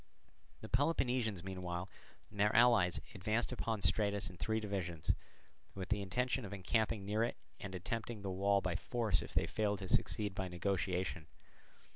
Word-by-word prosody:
The 110 Hz, -, -7 dB
Peloponnesians 125 Hz, -, +1 dB
meanwhile 90 Hz, -1 st, -4 dB, 0.4 s
and 105 Hz, -, -11 dB
their 105 Hz, +1 st, +3 dB
allies 115 Hz, -7 st, +5 dB
advanced 110 Hz, +6 st, 0 dB
upon 115 Hz, -4 st, -2 dB
Stratus 100 Hz, -3 st, +2 dB
in 90 Hz, -, -13 dB
three 110 Hz, +5 st, 0 dB
divisions, 95 Hz, -6 st, -1 dB, 0.6 s
with 95 Hz, -1 st, -5 dB
the 105 Hz, -1 st, +1 dB
intention 125 Hz, +6 st, 0 dB
of 100 Hz, -, -7 dB
encamping 100 Hz, +2 st, 0 dB
near 105 Hz, +3 st, +1 dB
it 120 Hz, -, -1 dB, 0.2 s
and 95 Hz, -2 st, -6 dB
attempting 110 Hz, +3 st, -4 dB
the 95 Hz, -, -2 dB
wall 100 Hz, +1 st, +3 dB
by 90 Hz, -2 st, -1 dB
force 110 Hz, +1 st, +1 dB
if -, -, -9 dB
they -, -, +3 dB
failed 105 Hz, -2 st, 0 dB
to 95 Hz, -1 st, -6 dB
succeed 105 Hz, +2 st, +1 dB
by 95 Hz, 0 st, -2 dB
negotiation. 90 Hz, -2 st, -1 dB
100 Hz, 160 wpm, -36 LUFS, 95-110 Hz, 0.6 s, allies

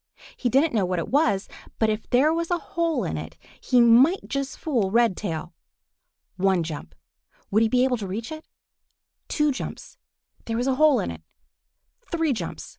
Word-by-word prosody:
He 245 Hz, -, -1 dB
didn't 275 Hz, +5 st, +3 dB
know 215 Hz, -4 st, +2 dB
what 180 Hz, 0 st, -1 dB
it 170 Hz, -, -3 dB
was, 220 Hz, -9 st, +2 dB, 0.3 s
but 220 Hz, -1 st, +2 dB
if 215 Hz, +1 st, -5 dB
there 280 Hz, +6 st, +4 dB
was 335 Hz, 0 st, -2 dB
a 350 Hz, -, +1 dB
hole 335 Hz, 0 st, -1 dB
in -, -, -3 dB
it -, -, -9 dB, 0.2 s
he 250 Hz, -, +3 dB
might 245 Hz, +10 st, +4 dB
yet 275 Hz, -1 st, -1 dB
fool 250 Hz, -9 st, -1 dB
Redtail. 195 Hz, -7 st, 0 dB, 0.8 s
One 190 Hz, -2 st, +2 dB
jump! 145 Hz, -, -7 dB, 0.6 s
Would 215 Hz, +3 st, +3 dB
he 225 Hz, -, +3 dB
be 250 Hz, +2 st, +3 dB
able 255 Hz, -1 st, +1 dB
to 205 Hz, -3 st, -5 dB
reach 220 Hz, -, -5 dB
it? 315 Hz, 0 st, -8 dB, 0.8 s
Two 300 Hz, -1 st, +1 dB
jumps! -, -, -7 dB, 0.5 s
There 225 Hz, 0 st, -2 dB
was 245 Hz, -, 0 dB
a 265 Hz, -, +2 dB
hole 300 Hz, -5 st, +6 dB
in -, -, -2 dB
it! 80 Hz, -1 st, -10 dB, 0.9 s
Three 325 Hz, -4 st, +1 dB
jumps! 180 Hz, -8 st, -6 dB
240 Hz, 180 wpm, -24 LUFS, 195-300 Hz, 0.9 s, hole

